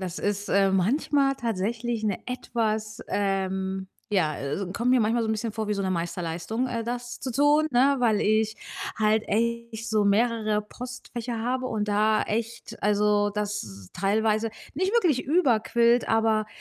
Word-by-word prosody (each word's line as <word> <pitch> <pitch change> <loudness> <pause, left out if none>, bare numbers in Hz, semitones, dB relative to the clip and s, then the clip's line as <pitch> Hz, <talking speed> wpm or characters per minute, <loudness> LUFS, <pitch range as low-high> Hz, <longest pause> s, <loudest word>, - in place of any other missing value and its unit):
das 185 -1 -4
ist, 205 0 -2
äh, 195 0 +3
manchmal 275 - +2
tatsächlich 230 +1 -2
'ne 205 -3 0
etwas, 220 -3 -2
ähm 190 -1 -1 0.3
ja, 160 -6 +2
äh, 140 - -4
also, 180 +5 -3
kommt 235 +4 0
mir 255 - +5
manchmal 230 +2 +2
so 220 - -2
'n - - +2
bisschen 220 +1 -3
vor 220 -1 -3
wie 210 - +1
so 200 - -2
'ne 190 - -1
Meisterleistung, 170 +6 -2
äh, 230 -2 -2
das 240 +1 -5
zu 260 - -3
tun, 290 +4 +4
ne, 270 +3 +4
weil 225 -4 +2
ich 215 0 +2 0.4
halt 215 0 +2
echt 235 0 -1
so 215 -1 +2
mehrere 215 0 +2
Postfächer 240 +1 -6
habe 255 +3 -1
und 215 -4 -2
da 215 +1 +2
echt 230 +2 -4
also, 210 0 +3
das 200 - -5
teilweise 215 +4 +1 0.3
nicht 375 +6 0
wirklich 355 - +3
überquillt, 240 -6 +3
aber, 220 -1 +2
220 Hz, 165 wpm, -26 LUFS, 205-240 Hz, 0.4 s, mir